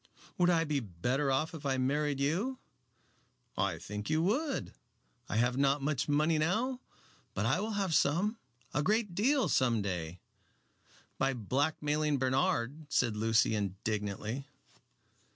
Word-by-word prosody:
"Would 175 0 +5
I 165 -2 +3
be 150 -3 0
better 125 - -1
off 155 +5 0
if 160 -3 -8
I 135 -2 0
married 140 +2 0
you?" 185 - 0 1.0
"I - - 0
think 105 +3 -6
you 155 +1 +2
would. 270 - -1 0.6
I - - -2
have 120 +3 +2
not 140 0 +2
much 145 -1 -1
money 155 +2 +3
now, 230 +11 0 0.6
but - - 0
I - - +2
will 220 +1 -2
have 195 -4 0
some 190 +11 +2 0.3
a 150 - +1
great 210 +2 +1
deal 260 +9 +2
some 120 -5 +2
day." 90 -3 -4 1.0
"By 135 0 +1
blackmailing 145 +5 0
Bernard," 130 +2 0
said 120 -6 +1
Lucy, 110 +1 +3
indignantly. 105 +5 -3
145 Hz, 135 wpm, -32 LUFS, 120-165 Hz, 1.0 s, Would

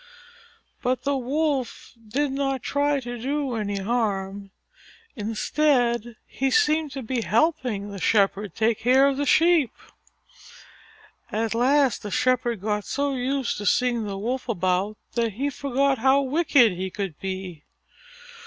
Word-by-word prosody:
But 255 0 -1
the 280 +1 0
Wolf 270 0 -2
did 275 +6 -1
not 270 -2 -2
try 285 0 +1
to 240 -1 -6
do 275 +1 -2
any 205 -3 -2
harm. 200 -2 -2 0.7
Instead 240 +1 0
he 270 +1 -2
seemed 310 -6 +2
to 270 - -5
be 240 +1 -2
helping 235 -5 0
the 200 -2 -7
Shepherd 200 -2 +1
take 220 0 +1
care 260 +4 +4
of 275 -1 0
the 285 0 -1
Sheep. 325 -3 +4 1.6
At 220 +1 -1
last 265 +2 +2
the 205 - -6
Shepherd 240 -1 0
got 210 0 -1
so 280 +4 -1
used 260 -2 -1
to 205 - -3
seeing 240 +1 +2
the 195 -1 -4
Wolf 245 +5 -3
about 185 +1 0 0.2
that 230 -3 0
he 275 +7 -2
forgot 275 -1 0
how 270 +3 +4
wicked 280 -4 +3
he 185 +1 -4
could 190 -5 -5
be. 185 -5 -6
245 Hz, 140 wpm, -24 LUFS, 210-275 Hz, 1.6 s, care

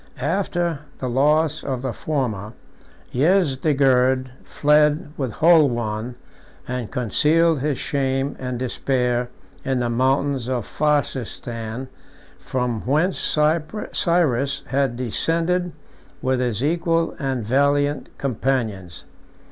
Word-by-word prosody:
After 175 -4 -1 0.2
the 130 - -4
loss 150 +5 +2
of 130 -2 -3
the 130 -3 -2
former, 115 -9 -3 0.6
Yezdegerd 135 -5 +2
fled 150 0 +2
from 135 -3 -2
Holwan, 125 -8 +2 0.5
and 125 -3 -4
concealed 155 - +2
his 145 0 -1
shame 135 -1 -1
and 125 -1 -3
despair 125 -1 -1 0.3
in 130 -1 0
the 120 -1 -1
mountains 130 +1 +1
of 125 -4 -1
Farsistan, 130 -5 -2 0.5
from 125 -4 -2
whence 155 +8 +1 0.7
Cyrus 140 -6 +1
had 135 -2 0
descended 165 +9 0 0.5
with 130 -1 0
his 120 -2 -1
equal 165 +1 +1
and 135 -6 -2
valiant 145 +4 +1
companions. 110 - -2
135 Hz, 100 wpm, -22 LUFS, 125-150 Hz, 0.7 s, loss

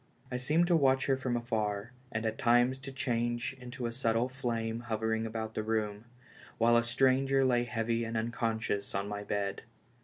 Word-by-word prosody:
I 125 - -1
seemed 150 +7 +2
to 175 -1 +3
watch 135 -4 +3
her 135 - +3
from 130 -2 -1
afar, 110 -2 -2 0.2
and 110 0 -2
at 110 0 -2
times 120 +2 +4
to 135 0 -7
change 120 -1 -1
into 125 0 -6
a 115 - -1
subtle 115 0 +1
flame 115 -3 -2
hovering 110 -1 -1
about 110 0 -4
the 110 - -1
room, 110 -1 -2 0.5
while 120 +1 +4
a 120 - +5
stranger 135 +2 +3
lay 120 -1 +3
heavy 115 -1 -1
and 115 0 -3
unconscious 110 -3 -1
on 100 +1 -1
my 105 0 -4
bed. 100 -1 -2
115 Hz, 180 wpm, -31 LUFS, 110-125 Hz, 0.5 s, a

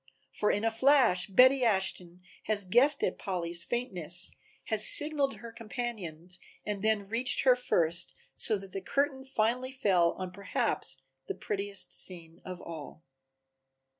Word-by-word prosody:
For 210 - 0
in 205 +2 0
a 225 - +2
flash 235 -7 +3
Betty 255 +6 +5
Ashton 190 -4 0 0.2
has 205 -2 0
guessed 260 +9 +3
at - - -1
Polly's 170 -3 -2
faintness, 180 -8 -3 0.3
has 215 -1 +3
signaled 290 -2 +2
her 235 -1 -10
companions 205 -7 -6 0.3
and 205 -2 -3
then 215 -2 0
reached 230 +4 +2
her 255 -2 +6
first, 170 -8 -1 0.2
so 215 - +2
that 195 -1 -11
the 195 - -5
curtain 275 +5 -1
finally 255 0 -1
fell 190 -10 +2
on 185 -1 -6
perhaps 200 - +1 0.2
the - - -4
prettiest 200 -1 -4
scene 170 -3 -4
of 185 -1 -8
all. 160 -1 -9
205 Hz, 140 wpm, -30 LUFS, 180-245 Hz, 0.3 s, her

